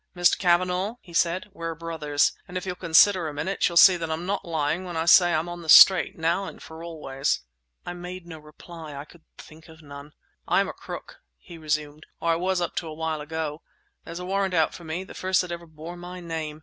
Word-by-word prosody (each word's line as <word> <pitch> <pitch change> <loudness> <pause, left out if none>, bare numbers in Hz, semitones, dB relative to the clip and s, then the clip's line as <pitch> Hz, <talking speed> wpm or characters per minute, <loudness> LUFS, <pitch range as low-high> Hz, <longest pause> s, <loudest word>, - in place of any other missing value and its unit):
"Mr. 175 -1 +4
Cavanagh," 180 +3 +1
he 175 - -16
said, 170 +3 +1
"we're 165 -3 -5
brothers! 155 -3 0 0.2
And 180 - -5
if 180 - -5
you'll 185 - -3
consider 180 +1 +4
a 150 - -5
minute, 190 +7 0
you'll 170 - -2
see 180 +1 +8
that 165 -1 -5
I'm 160 +2 -3
not 200 +1 -2
lying 160 0 -1
when 175 -3 -6
I 160 - -1
say 175 0 +6
I'm 160 +1 0
on 175 0 -7
the 160 - -9
straight, 190 +3 +8
now 170 +4 0
and - - -9
for 160 +1 -11
always!" 145 - -2 0.4
I 175 - -5
made 180 0 -8
no 165 -2 -10
reply: 155 0 -11
I 140 +1 -7
could 170 +2 -19 0.2
think 160 +2 -15
of 160 0 -15
none. 145 0 -11 0.3
"I'm - - +2
a - - -6
crook," - - -10 0.2
he 165 - -13
resumed, 150 -1 -3
"or 170 - 0
I - - +2
was 180 +1 -1
up 175 - -3
to 170 - -2
a 155 - -7
while 160 -1 -3
ago. 155 0 -5 0.4
There's 170 - -8
a 180 - -6
warrant 195 0 -1
out 160 -2 +2
for 175 - -11
me—the 170 +4 -6
first 185 0 0
that 180 -1 -6
ever 170 0 -7
bore 160 +2 -10
my 180 +1 -9
name. 160 -3 -5
170 Hz, 225 wpm, -25 LUFS, 155-180 Hz, 0.4 s, see